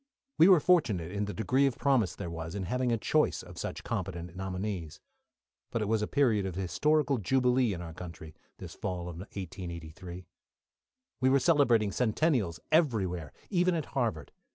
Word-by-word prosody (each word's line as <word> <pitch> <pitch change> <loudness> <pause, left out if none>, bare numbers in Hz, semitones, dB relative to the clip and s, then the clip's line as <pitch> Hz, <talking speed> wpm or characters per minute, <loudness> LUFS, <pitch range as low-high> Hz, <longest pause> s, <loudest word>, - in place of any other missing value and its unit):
We 165 - +8
were 185 -4 +7
fortunate 110 - +2
in 100 +1 -1
the 105 - -5
degree 130 +5 +2
of 130 - -3
promise 125 - +2
there 85 - -5
was, 80 +1 -6
in 100 - -3
having 125 +6 0
a 115 - +2
choice - - +1
of - - -11
such - - -5
competent 90 -2 -4
nominees. 95 -3 -4 0.7
But 115 - -1
it - - -2
was 110 0 +1
a 105 - -1
period 120 -8 +2
of 90 - -5
historical 140 - +1
jubilee 125 +3 +2
in 90 -2 -4
our 80 -1 -8
country, 80 -2 -9 0.2
this - - -9
fall 90 -1 -4
of 85 -1 -7
1883. 90 -2 -7 0.9
We 130 - +3
were 135 - +5
celebrating 125 - +3
centennials 110 - +1
everywhere, 100 - +1 0.2
even 180 -1 +3
at 160 - -2
Harvard. 115 - -1
105 Hz, 170 wpm, -30 LUFS, 90-130 Hz, 0.9 s, We